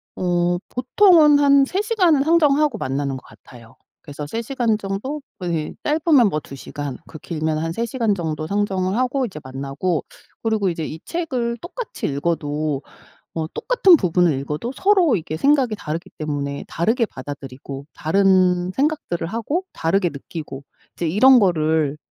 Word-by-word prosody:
어 175 -1 +1
보통은 300 +3 +5
한 280 -1 +5
3 375 +8 -1
시간은 365 -10 +3
상정하고 300 -5 +3
만나는 135 -3 -2
것 130 - -13
같아요. 115 -2 -16 0.3
그래서 145 0 -7
3 225 +10 -4
시간 235 -3 0
정도 210 +9 -4 0.2
예 165 -3 -2
짧으면 295 -6 +4
뭐 155 - -1
2 140 - -11
시간 140 0 -6
그 155 - -10
길면 155 -1 -2
한 165 +1 -2
3 230 +4 -1
시간 230 -3 0
정도 155 -3 -3
상정을 195 0 0
하고 255 +1 +1
이제 190 -9 -7
만나고 140 +6 -3 0.4
그러고 220 -4 +1
이제 165 -2 -3
이 160 - -7
책을 255 -9 -2
똑같이 395 +7 -5
읽어도 150 -1 -1 0.5
뭐 160 -1 -2
똑같은 390 -8 +5
부분을 180 - +2
읽어도 150 - -4
서로 375 - +3
이게 160 -3 -4
생각이 270 - +3
다르기 160 0 -5
때문에 145 -2 -3
다르게 225 +8 +1
받아들이고 135 -2 -8
다른 185 +1 +2
생각들을 280 - -1
하고 235 - -2
다르게 175 +2 +1
느끼고 140 -1 -8 0.3
이제 170 - -2
이런 250 +10 +6
거를 155 -6 +1
185 Hz, 315 characters per minute, -21 LUFS, -, 0.5 s, 이런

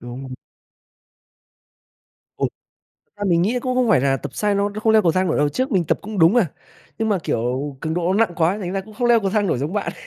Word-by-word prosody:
Đúng. 130 +2 -8 2.0
Ừm, - - 0 0.6
thật - - -47
ra 205 - -4
mình 170 -1 +3
nghĩ 230 +6 +1
cũng 255 +1 -2
không 250 -2 +2
phải 215 - +4
là 135 0 +2
tập 140 0 -8
sai 210 -1 0
nó 200 0 +1
nó 205 +1 -7
không 220 -1 +3
leo 220 - +5
cầu 170 -4 +3
thang 185 0 +1
nổi - - 0
đâu, 145 0 +2
trước 260 - -2
mình 180 -3 +2
tập - - 0
cũng 210 -1 -6
đúng 165 +1 +6
mà, 235 -5 +3 0.5
nhưng 225 - 0
mà, 205 -3 +1
kiểu, 130 +4 -2
cường 160 0 -2
độ 175 +1 0
nó 200 - +1
nặng 175 - -12
quá 175 +4 +1
thành 185 -3 -4
ra 195 - -1
cũng 215 +3 -14
không 240 +2 -1
leo 235 -2 +5
cầu 195 - -1
thang 210 0 +1
nổi 165 - 0
giống 145 +6 -3
bạn, 205 -1 -2
190 Hz, 260 wpm, -21 LUFS, 155-215 Hz, 2.0 s, đúng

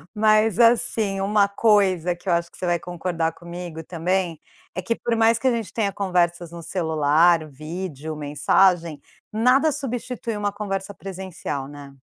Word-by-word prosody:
Mas, 215 -1 +3
assim, 220 -4 +3
uma 200 0 +3
coisa 195 -4 +2
que 175 +3 -19
eu 175 - +3
acho 170 0 -1
que - - -16
você - - -4
vai 175 -1 +2
concordar 170 -1 -2
comigo 170 -1 -8
também, 175 0 -1 0.4
é 185 - -2
que 185 - -1
por 230 0 -2
mais 225 0 +3
que 265 - 0
a - - +4
gente 230 -3 -3
tenha 210 -3 0
conversas 175 -3 0
no 170 0 -8
celular, 160 -1 +2
vídeo, 155 +1 -6
mensagem, 150 +2 +2 0.3
nada 250 +8 +3
substitui 250 -3 -4
uma 205 0 -1
conversa 200 -1 -4
presencial, 185 -8 -6
né? 145 -1 -11
185 Hz, 160 wpm, -23 LUFS, 165-210 Hz, 0.4 s, a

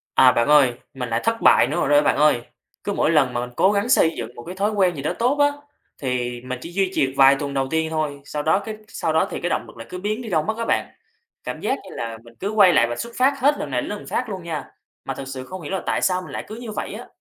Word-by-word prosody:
À, 130 -1 +7
bạn 120 0 +1
ơi, 145 -4 +5 0.2
mình 125 -3 -5
lại 115 0 +1
thất 230 0 0
bại - - +6
nữa 150 - -3
rồi - - -2
đó, 145 0 +6
bạn - - +2
ơi. 150 -4 +4 0.4
Cứ - - -2
mỗi - - +2
lần 135 -6 +3
mà 120 - -1
mình 125 - -5
cố 190 - +4
gắng 205 +3 0
xây 165 -10 +4
dựng 120 +1 -6
một 120 - -9
cái 180 - -8
thói 205 +3 0
quen 190 -4 +2
gì 140 - -5
đó 150 - -1
tốt 250 +4 +2
á, 290 - +6 0.5
thì 125 -2 -2
mình 130 0 -5
chỉ 170 - -8
duy 190 +1 0
trì 135 - +2
được 130 - -7
vài 135 0 +7
tuần 140 -1 -3
đầu 135 -1 0
tiên 160 +2 0
thôi, 155 -3 -2
sau 150 0 -4
đó 160 +5 +3
cái 215 +1 -6
sau 160 -7 -2
đó 160 - +3
thì - - -4
cái 175 - -1
động - - 0
lực - - -14
lại 115 0 -9
cứ 180 - -6
biến 210 +5 -2
đi 230 - -7
đâu 160 -5 +1
mất 220 +4 -2
á 230 - -2
bạn. - - +1 0.6
Cảm - - -6
giác 270 - 0
như 190 - -11
là 115 -1 -4
mình 115 0 -16
cứ 195 - -2
quay 205 -4 +6
lại 120 -7 +4
vạch 120 - -4
xuất 235 0 -5
phát 265 +3 +4
hết 285 +3 +4
lần 145 - -4
này 125 -1 0
đến - - -6
lần 210 - -6
khác 250 - -2
luôn 190 -3 -5
nha. 160 -4 -4 0.4
Mà - - -3
thực 135 - -7
sự 130 -1 -6
không 185 +5 -8
hiểu 150 - -7
là 190 - -1
tại - - 0
sao 185 -1 +1
mình 180 - -10
lại - - -4
cứ 215 - -7
như 235 -1 -7
vậy - - -4
á. - - -8
160 Hz, 315 wpm, -22 LUFS, 135-205 Hz, 0.6 s, À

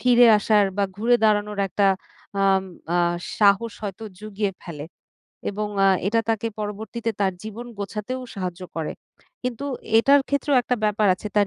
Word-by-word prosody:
ফিরে 245 -1 +6
আসার 210 0 +4
বা, 205 - +2
ঘুরে 235 +3 +3
দাঁড়ানোর 210 -1 +2
একটা 200 +2 +1 0.6
আম 195 -1 +3 0.3
আ - - +3 0.4
সাহস 205 +2 +4
হয়তো 205 +2 -5
জুগিয়ে 210 -1 -2
ফেলে 155 -4 -7 0.7
এবং 210 +1 -3 0.2
আ - - +6 0.2
এটা 225 +2 +2
তাকে 225 0 0
পরবর্তীতে 220 +2 -3
তার 190 -1 +2
জীবন 220 +3 -7
গোছাতেও 210 +5 -4
সাহায্য 185 -2 -4
করে। 160 -2 -2 0.5
কিন্তু 250 +1 -3 0.3
এটার 280 +4 +6
ক্ষেত্রেও 280 0 +1
একটা 250 - 0
ব্যাপার 210 0 +2
আছে। 195 - -9
তার 205 -1 +5
210 Hz, 150 wpm, -24 LUFS, 200-230 Hz, 0.7 s, ফিরে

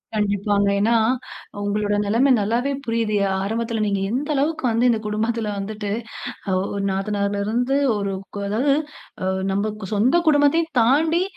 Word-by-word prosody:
கண்டிப்பாங்க. 205 -1 +1
ஏன்னா, 225 +3 +3 0.7
உங்களோட 205 0 0
நிலமை 240 +7 +3
நல்லாவே 235 +7 0
புரியுது. 230 -2 0
அ - - -1
ஆரம்பத்தில 225 +1 -2
நீங்க 200 -1 0
எந்த 280 +5 -2
அளவுக்கு 295 +3 0
வந்து, 230 +2 +2
இந்த 225 -2 +2
குடும்பத்தில 220 +1 -1
வந்துட்டு 205 0 -4 0.8
ஒ - - -2
நாத்தனாருலருந்து 205 +5 -1 0.2
ஒரு 200 -1 -2 0.2
கொ - - -3
அதாவது 265 +7 +2 0.5
அ - - -1 0.3
நம்ம 200 +2 0 0.2
சொந்த 230 +9 +3
குடும்பத்தையும் 310 +2 +3
தாண்டி 320 +8 +3
220 Hz, 130 wpm, -22 LUFS, 205-255 Hz, 0.8 s, ஏன்னா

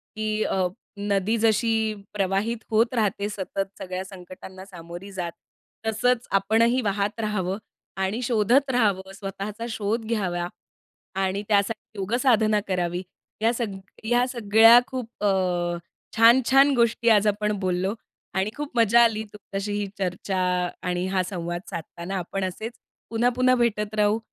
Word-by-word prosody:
की 215 0 -1
अ, 185 -1 +1 0.3
नदी 200 +2 0
जशी 220 0 +2 0.2
प्रवाहित 200 +4 0
होत 230 +3 +2
राहते. 205 -2 0
सतत 195 0 -4
सगळ्या 185 0 -4
संकटांना 185 0 -11
सामोरी 175 +1 -10
जात. 175 -3 -4 0.6
तसंच 245 +2 +1
आपणही 225 +6 +3
वाहत 205 +1 -1
राहावं 200 -3 -1 0.5
आणि 210 +6 -1
शोधत 240 +4 +2
राहावं, 200 -6 +1
स्वतःचा 200 +3 -6
शोध 220 +1 -2
घ्यावा 180 -6 -1 0.8
आणि 195 +2 -1
त्यासाठी 215 +1 0
योगसाधना 215 0 +2
करावी. 180 -1 -1 0.4
या 230 +1 +4
सग 220 -5 -3 0.3
या 240 +2 +3
सगळ्या 225 0 +6
खूप 250 -3 -5
अ, - - +4 0.9
छान-छान 260 +4 +6
गोष्टी 235 0 +2
आज 210 -1 +5
आपण 210 +1 +1
बोललो 185 +2 0 0.4
आणि 190 +2 0
खूप 290 -4 -6
मजा 230 +1 +5
आली 220 -1 +1
तुमच्याशी 205 0 -5
ही 205 0 -1
चर्चा 190 +1 -2 0.5
आणि 180 +1 -1
हा 190 -1 +1
संवाद 175 -1 -3
साधताना. 170 +2 -6
आपण 190 +2 -3
असेच 215 +5 -4 0.4
पुन्हा-पुन्हा 245 +2 +3
भेटत 215 -3 0
राहू 210 +1 +3
210 Hz, 130 wpm, -25 LUFS, 190-230 Hz, 0.9 s, सगळ्या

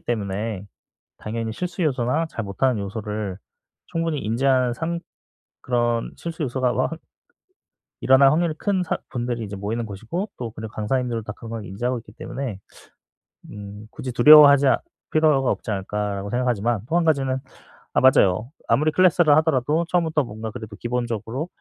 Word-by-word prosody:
때문에 105 -2 -3 0.5
당연히 110 +1 -4
실수 180 +5 -4
요소나 145 +1 +1
잘 115 -8 -5
못하는 110 +4 0
요소를 105 -1 -4 0.5
충분히 165 -3 -2
인지한 125 +2 +2
상 170 +4 -3 0.6
그런 120 -2 0
실수 165 -1 -5
요소가 130 -1 0
와한 160 +6 -1 1.0
일어날 135 +1 +6
확률이 165 0 +1
큰 195 -3 0
사 175 - -2
분들이 120 -2 -3
이제 100 -1 -6
모이는 110 +4 -3
곳이고 115 - -4
또 120 -2 -4
그리고 110 -1 -8
강사님들도 115 +1 -1
다 105 - -5
그걸 115 -2 -7
인지하고 120 +7 -2
있기 105 -2 -14
때문에 125 -4 -5 0.9
음 105 +1 -9
'굳이 130 -1 -6
두려워하지 140 +2 +8
아 - - +4 0.3
필요가 150 -4 +3
없지 - - -5
않을까.'라고 100 0 -3
생각하지만, 120 -2 0
또 165 - 0
1 175 - +2
가지는 135 -4 +1 0.5
아 - - +3
맞아요. 115 -3 +4 0.2
아무리 155 +2 +3
클래스를 175 -2 +4
하더라도 155 +1 +2
처음부터 160 -4 +1
뭔가 110 0 -6
그래도 110 -2 -8
기본적으로 120 - -3
120 Hz, 365 characters per minute, -23 LUFS, 110-150 Hz, 1.0 s, 두려워하지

